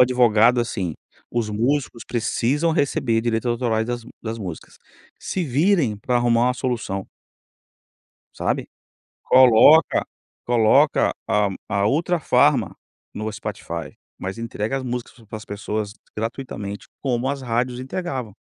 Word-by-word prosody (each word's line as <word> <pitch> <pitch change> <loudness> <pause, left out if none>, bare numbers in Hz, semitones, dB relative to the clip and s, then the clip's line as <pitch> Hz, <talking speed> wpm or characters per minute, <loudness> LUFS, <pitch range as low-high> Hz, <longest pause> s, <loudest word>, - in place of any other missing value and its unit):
advogado, 120 -1 +5
assim, 95 -8 -3 0.4
os 115 -3 -1
músicos 120 +3 -1
precisam 125 +7 0
receber 135 -7 +1
direitos 115 +1 0
autorais 115 -2 0
das 120 -1 -4
m 125 - -13
das 115 0 -4
músicas. 90 -7 -8 0.4
Se 185 -3 -3
virem 145 - +2
pra 125 +4 0
arrumar 120 -1 +3
uma 125 - 0
solução. 120 -7 -3 1.3
Sabe, - - -1 0.6
coloca 130 +5 +6 0.4
coloca 115 -3 +4 0.2
a 105 -1 +2 0.2
a 100 0 +1
Ultrafarma 165 +4 +2 0.4
no 110 +1 -4
Spotify, - - -6 0.2
mas 95 +4 -6
entrega 115 +2 -3
as 135 - -4
músicas 125 -1 -4
para 110 - -7
as 110 - -12
pessoas 105 0 -4 0.2
gratuitamente, 105 -3 -5 0.2
como 125 -1 0
as 140 -1 -3
rádios 125 +1 -1
entregavam. 130 - -4
120 Hz, 125 wpm, -22 LUFS, 110-130 Hz, 1.3 s, coloca